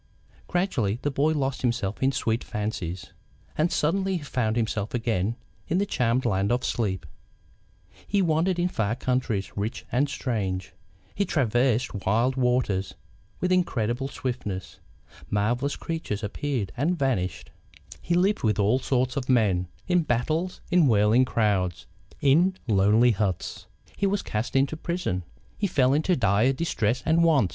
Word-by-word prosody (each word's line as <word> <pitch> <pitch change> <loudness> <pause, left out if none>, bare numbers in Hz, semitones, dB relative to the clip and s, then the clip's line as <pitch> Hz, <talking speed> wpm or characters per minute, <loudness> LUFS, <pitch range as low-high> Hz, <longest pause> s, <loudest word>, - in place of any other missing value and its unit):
Gradually 135 - 0
the 145 - 0
boy 145 +3 +2
lost 135 -3 -1
himself 115 -5 -1
in 135 +1 +3
sweet 115 -3 -1
fancies, 95 -4 -4 0.4
and 160 +3 +1
suddenly 190 +4 +1
he 160 - -7
found 120 -6 -1
himself 110 -1 -1
again, 115 -2 0 0.3
in 170 - 0
the 200 - +2
charmed 125 - 0
land 100 -2 +1
of 125 +1 +1
sleep. 95 -7 -1 1.0
He 200 - +1
wandered 170 +1 +2
in 175 0 +2
far 110 - -1
countries, 125 -6 -1
rich 105 +3 -3
and 135 +4 +2
strange; 95 -9 -3 0.4
he 200 - 0
traversed 125 - +1
wild 115 +6 +1
waters 125 -7 0 0.4
with 180 - 0
incredible 135 -8 +1
swiftness; 120 -9 -5 0.5
marvellous 120 +7 0
creatures 160 -11 -4
appeared 110 -1 -2
and 165 +7 0
vanished; 120 - -1 0.5
he 170 - 0
lived 190 +4 +2
with 105 -3 +1
all 105 +5 +3
sorts 130 0 0
of 135 -2 -3
men, 100 -8 +3 0.2
in 180 -1 +3
battles, 155 +6 -1
in 175 -4 +5
whirling 110 +2 +4
crowds, 95 - 0 0.4
in 170 +7 +4
lonely 110 +3 +4
huts. 100 -4 -2 0.3
He 200 - +1
was 200 +1 0
cast 110 +4 -3
into 135 +3 +2
prison. 165 - -2 0.4
He 205 - +1
fell 130 -6 +3
into 160 +5 +2
dire 110 - +3
distress 125 -5 -1
and 165 +1 +3
want. 145 - +4
125 Hz, 145 wpm, -26 LUFS, 105-155 Hz, 1.0 s, in